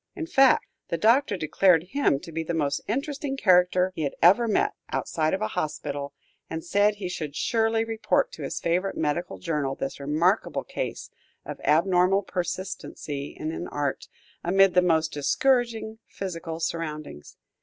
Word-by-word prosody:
In 335 -4 -4
fact, 270 -4 +4 0.2
the 170 - -2
Doctor 225 - +3
declared 165 +1 +3
him 280 - +2
to 165 - -10
be 165 +1 -3
the 165 +1 -3
most 145 -3 0
interesting 275 +4 -2
character 180 -3 +4
he - - -4
had 140 -2 -2
ever 200 +8 +5
met 215 - +2
with, - - -9
outside 155 -1 0
of 200 - -3
a 215 - -1
hospital, 145 -5 -3 0.4
and 160 0 -5
said 205 +3 +3
he 200 -3 -5
should 155 -5 -5
surely 225 -1 +1
report 225 - 0
to - - -10
his - - -3
favorite 180 +3 -1
medical 160 +3 -2
journal 150 -6 -2
this 135 - -5
remarkable 155 +8 +1
case - - -5 0.3
of - - -7
abnormal 180 +4 +3
persistency 180 -6 -5
in 155 - -3
an 175 - -5
art, 145 -2 -3 0.4
amid 195 +1 +4
the 180 - +5
most 160 -3 +2
discouraging 225 - +1
physical 165 -4 -6
surroundings. 155 - -5
180 Hz, 160 wpm, -26 LUFS, 155-215 Hz, 0.4 s, ever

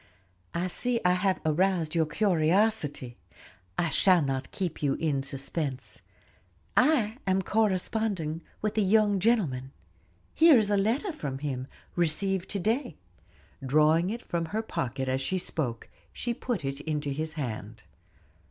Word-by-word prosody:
"I 170 +1 0
see 235 +6 0
I 180 - +5
have 185 +1 +1
aroused 165 0 +1
your 165 -2 +2
curiosity, 165 - +1 0.6
I 170 - +1
shall 180 +3 +4
not 135 -1 -2
keep 180 -5 -4
you 140 -2 +1
in 150 -4 0
suspense. 135 -3 -4 0.7
I 250 -4 +3
am 190 0 +2
corresponding 195 -5 0 0.2
with 215 0 0
a - - +4
young 205 0 +3
gentleman. 165 - +1 0.6
Here 320 -4 +7
is 210 -2 +2
a - - +4
letter 230 - +1
from 145 - -5
him, 135 -2 -4 0.3
received 180 +3 0
to 200 - -2
day;" 225 - -1 0.7
drawing 155 +6 +3
it 235 +3 -4
from 170 -1 -2
her 215 +7 -3
pocket 130 - -3
as 130 +1 0
she 185 +8 -1
spoke, 135 -10 -3 0.2
she 240 - -3
put 230 - -3
it 135 +1 -3
into 150 -1 -2
his 155 +3 -3
hand. 115 -7 -5
170 Hz, 145 wpm, -28 LUFS, 145-210 Hz, 0.7 s, Here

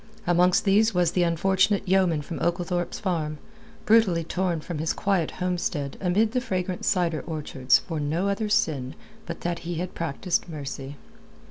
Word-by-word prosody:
Amongst 175 +3 +3
these 210 +1 +4
was 175 -2 +3
the 180 - +1
unfortunate 190 +4 +2
yeoman 180 -5 +2
from 165 - -6
Oglethorpe's 175 0 -1
Farm, 160 -6 -2 0.5
brutally 210 -7 +4
torn 175 0 -1
from 155 0 -6
his 160 +1 0
quiet 190 -5 0
homestead 175 -6 -2
amid 200 +4 +2
the 250 +1 0
fragrant 185 -6 -3
cider 170 -4 +1
orchards 145 -5 +2
for 160 -3 -5
no 160 +6 0
other 200 +2 -1
sin 155 -11 0 0.3
but - - -6
that 175 -1 -2
he 175 0 -5
had 175 +2 -4
practised 165 +3 -2
mercy. 140 -2 -6
175 Hz, 155 wpm, -26 LUFS, 160-190 Hz, 0.5 s, these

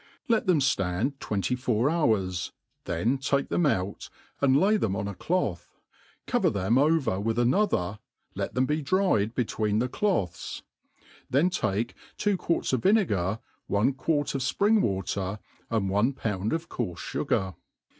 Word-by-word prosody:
Lt 230 -4 +2
them 175 -5 +4
ftand 130 +1 0
twenty 100 +3 -1
four 125 -1 +1
hours; 105 - +1 0.3
then 110 +11 0
take 140 +1 0
them 175 - +2
out, 95 -6 -2 0.3
and 140 0 +4
lay 205 +6 +4
them 105 - 0
on 100 - -2
a 100 - -4
cloth, 110 - -2 0.5
cover - - +2
them 100 +6 +1
over 150 -9 +2
with 115 +3 -1
another, 120 - +1 0.3
let - - -4
them 130 +1 +3
be 150 +3 0
dried 145 - +1
be 125 - +1
tween 105 -1 -1
the 120 +3 +1
cloths; 120 - -2 0.7
then 155 +8 +3
take 115 - -1 0.2
two 205 -1 +1
quarts 170 -6 -1
of 130 - +1
vinegar, 110 - +2 0.3
one 105 +7 +2
quart 145 +2 0
of 135 - -2
fpring 205 - +3
water, 95 0 -1 0.3
and 110 -4 0
one 105 +8 +2
pound 105 -5 -2
of 165 +1 -2
coarfe 90 -9 -4
fugar. 95 +2 -1
120 Hz, 155 wpm, -27 LUFS, 100-150 Hz, 0.7 s, them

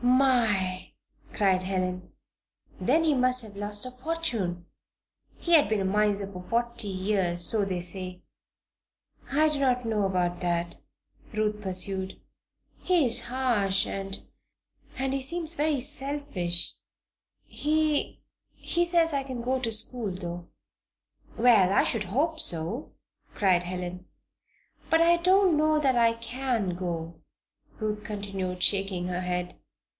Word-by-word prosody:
"My!" 235 -8 +2 0.4
cried 190 -3 +2
Helen. 185 -1 -2 0.7
"Then 325 - +2
he 315 -2 +3
must 255 -1 +3
have 210 -2 -11
lost 205 +1 -3
a 255 - -6
fortune! 250 - -3 0.7
He 345 - -1
has 305 -3 +7
been 215 -1 +1
a - - -1
miser 205 0 +1
for 180 -2 -8
forty 235 -1 -1
years, 185 -2 +1
so 210 +2 +1
they 185 -2 -2
say." 180 +1 -4 1.1
"I 310 +3 +4
do 300 -2 -2
not 250 -3 +1
know 215 -3 +1
about 175 -2 0
that," 175 -1 -1 0.6
Ruth 210 -1 -1
pursued. 190 0 -2 0.6
"He 355 -5 +2
is 235 - +1
harsh 235 -7 +1
and 195 0 -4 0.8
and 265 +1 -1
he 275 - -1
seems 325 +4 0
to 335 - -4
be 295 - +1
very 295 -4 +1
selfish. 275 - -1 0.7
He 305 0 0 0.3
he 345 0 0
says 340 -2 +3
I 275 -1 0
can 255 -3 -6
go 260 +2 0
to 235 -3 -2
school, 225 0 -3
though." 175 -1 -6 0.9
"Well, 225 -6 +5
I 200 - +4
should 220 -4 0
hope 305 - 0
so!" 170 - -2 0.4
cried 185 -3 +3
Helen. 180 0 -5 0.8
"But 325 0 +4
I 340 +1 +5
don't 370 0 +4
know 310 0 +3
that 270 -4 +2
I 230 -1 +4
can 230 -4 -2
go," 170 -2 -5 0.6
Ruth 210 -1 -2
continued, 195 -3 -4
shaking 195 -3 +1
her 180 0 -2
head. 180 0 -3
210 Hz, 140 wpm, -27 LUFS, 185-270 Hz, 1.1 s, has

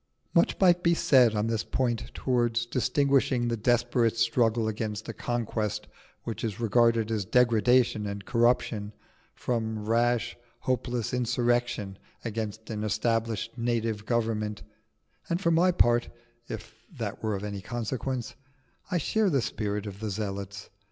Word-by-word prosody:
Much - - +3
might 180 -2 +5
be 170 -1 +3
said 125 -8 +5
on 105 +1 +1
this 115 -1 -1
point 120 -3 -1
towards 120 -2 +1
distinguishing 130 0 +2
the 115 - 0
desperate 120 0 +2
struggle 115 -1 +2
against 110 -1 -3
a 115 - -4
conquest 110 -3 -2 0.4
which 115 - -5
is 110 -2 -3
regarded 115 -1 +3
as 110 -3 0
degradation 120 0 +3
and 100 0 -5
corruption, 115 -3 +1 0.4
from 110 -3 -2
rash, 120 +1 +1 0.3
hopeless 125 -2 -1
insurrection 120 -4 0 0.3
against 110 -1 -4
an 105 -1 -3
established 110 +1 -1
native 115 -3 -1
government; 110 -3 -1 0.7
and 170 - 0
for 170 -3 +1
my 175 +3 +4
part 120 -8 +3 0.4
(if 110 0 -7 0.2
that 115 - -5
were 110 -2 -1
of 95 - -5
any 100 -1 -4
consequence) 120 +2 -3 0.6
I 180 - +1
share 210 +6 +1
the 140 -5 +2
spirit 105 -3 -2
of 100 -1 -7
the 110 0 -3
Zealots. 100 -1 -5
115 Hz, 140 wpm, -28 LUFS, 110-120 Hz, 0.7 s, might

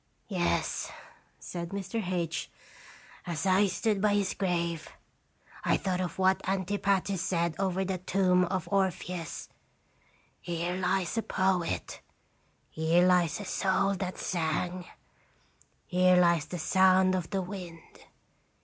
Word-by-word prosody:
" - - -43
" - - -42
Yes," 85 0 -1 0.5
said 170 -1 -6
Mr. 200 +3 -3
H. 165 -3 -2 0.8
"As 170 +1 -2
I 190 +2 +4
stood 210 +1 0
by 205 -1 +3
his 200 -2 +1
grave, 170 -4 -1 0.7
I - - +3
thought 185 -2 -1
of 175 -3 -4
what 190 0 +3
Antipater 195 0 0
said 170 -1 0
over 190 0 0
the 185 -1 -2
tomb 185 0 +2
of 185 -1 -3
Orpheus: 180 -3 -1 0.5
' - - -36 0.3
Here 175 +1 -2
lies 185 +3 0
a - - +1
poet; 190 -4 -1 0.7
here 165 +3 +3
lies 180 -2 +3
a 205 - -6
soul 195 +1 +1
that 185 -1 -4
sang; 175 +1 -2 1.0
here 180 0 +4
lies 170 -3 +4
the 180 - -5
sound 185 +3 +4
of 180 -3 -2
the 195 -2 -1
wind.' 180 -3 -9
185 Hz, 130 wpm, -29 LUFS, 170-190 Hz, 1.0 s, I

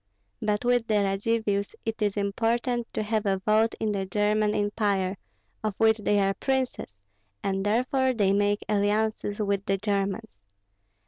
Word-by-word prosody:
But 210 +2 0
with 245 -2 +2
the 215 - +1
Radzivills 205 +1 0
it 225 0 -3
is 205 -1 0
important 230 +4 0
to 215 - 0
have 215 -1 -1
a 195 -1 +2
vote 215 +3 +2
in 215 - 0
the 195 -2 -2
German 210 +1 +1
Empire, 205 -2 0 0.5
of 215 -2 -1
which 220 0 +4
they 205 0 +2
are 195 0 +2
princes, 260 - -2 0.5
and 195 0 -1
therefore 255 +5 +1
they 205 -5 +2
make 205 +1 +1
alliances 210 0 0
with 200 -2 0
the 195 - +2
Germans. 195 - -2
210 Hz, 150 wpm, -27 LUFS, 200-225 Hz, 0.5 s, which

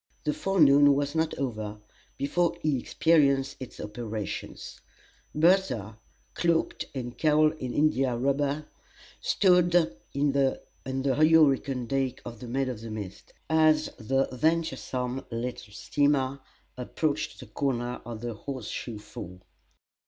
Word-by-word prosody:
The 150 - 0
forenoon 145 -7 +5
was 145 0 -1
not 160 0 0
over 110 -5 -3 0.4
before 170 +5 0
he 150 -4 +1
experienced 140 -2 +2
its 130 - -9
operations. 105 -1 -6 0.5
Bertha, 150 - +2 0.3
cloaked 170 -1 0
and 120 -2 -5
cowled 155 0 +3
in 130 -1 -4
India 135 -4 +2
rubber, 140 +3 0 0.6
stood 180 -3 +3
on 140 -2 +1
the 135 -1 +1 0.2
hurricane 135 -1 +3
deck 135 +1 -1
of 120 -2 -8
the 125 - -8
"Maid 130 +2 -1
of 115 -4 -5
the 115 - -7
Mist," 105 -3 -8
as 155 -1 +3
the 135 +4 +1
venturesome 130 -3 -1
little 120 -1 -5
steamer 140 +3 0 0.4
approached 145 +4 -2
the - - -9
corner 125 -3 -2
of 115 -2 -7
the 120 -1 -4
Horse 125 0 -6
Shoe 115 -3 -5
Fall. 105 -4 -9
135 Hz, 125 wpm, -28 LUFS, 120-150 Hz, 0.6 s, forenoon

